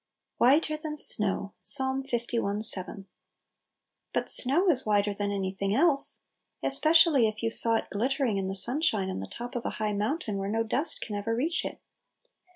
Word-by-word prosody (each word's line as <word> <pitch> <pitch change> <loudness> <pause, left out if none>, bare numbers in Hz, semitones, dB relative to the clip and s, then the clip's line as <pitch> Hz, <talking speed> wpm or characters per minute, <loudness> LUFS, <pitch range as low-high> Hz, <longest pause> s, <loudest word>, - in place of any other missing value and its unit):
"Whiter 305 +5 +1
than 305 0 -8
snow."— 200 -6 +4
Ps. 280 - +5
li. 240 -5 -4
7. 195 -1 -2 1.1
BUT - - -3
snow 300 +10 +2
is 270 -6 -1
whiter 205 -1 -1
than 205 0 -5
any 195 -2 -4
thing 195 +1 -4
else! 285 -2 +5 0.4
Especially 310 -2 +3
if 215 +1 -8
you 225 - -2
saw 230 0 +8
it - - -3
glittering 250 0 -2
in 190 -1 -4
the 190 - -5
sunshine 215 - -1
on - - -7
the 95 - -8
top 240 - -10
of 240 - -5
a - - -4
high 215 -1 -3
mountain, 215 - -4
where 195 0 -5
no 225 +2 -2
dust 275 +8 -2
can 210 - -7
ever 215 +3 -4
reach 315 +8 -3
it. - - -8
230 Hz, 175 wpm, -26 LUFS, 205-275 Hz, 1.1 s, saw